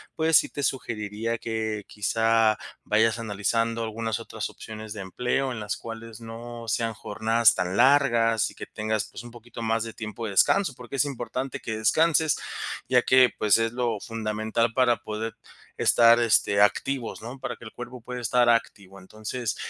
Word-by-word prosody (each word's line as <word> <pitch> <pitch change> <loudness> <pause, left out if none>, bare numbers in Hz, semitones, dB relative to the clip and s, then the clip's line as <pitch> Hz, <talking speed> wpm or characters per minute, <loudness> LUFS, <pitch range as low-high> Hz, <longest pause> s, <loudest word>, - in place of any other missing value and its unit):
pues 160 -1 +4
sí - - +2
te 145 - -5
sugeriría 115 -3 -2
que 110 -2 -3
quizá 110 +1 +2 0.3
vayas 110 +2 +2
analizando 115 +2 -1
algunas 110 0 -3
otras - - -5
opciones 110 -1 -9
de 105 - -6
empleo 125 +7 -1
en 120 - -5
las 105 0 -3
cuales 115 0 -9
no 115 +1 -8
sean 115 0 0
jornadas 110 +3 +2
tan 90 +1 -2
largas 120 -5 +4
y - - -18
que - - -8
tengas, 110 -1 -2
pues, - - -8
un 120 - -11
poquito 120 0 -11
más 115 0 0
de 115 -1 -7
tiempo 110 +1 -6
de 105 - -3
descanso, 145 - +3
porque 125 +2 -9
es 145 - +3
importante 130 +1 -4
que 110 -1 -4
descanses, 160 +6 +3 0.5
ya 125 -1 +4
que, 130 0 +5
pues, 105 0 +4
es 115 0 0
lo 120 -4 -1
fundamental 110 +1 -1
para 125 -2 +3
poder 110 +1 -5 0.4
estar, 115 0 +5
este, 105 -3 +3
activos, 115 +4 0
¿no?, 120 +4 -8
para 120 -2 -4
que - - -16
el 110 - -9
cuerpo 120 0 -9
pueda 125 +1 -6
estar 120 +1 +3
activo, 100 -4 -1
entonces, 110 +4 -5
115 Hz, 175 wpm, -26 LUFS, 110-120 Hz, 0.5 s, que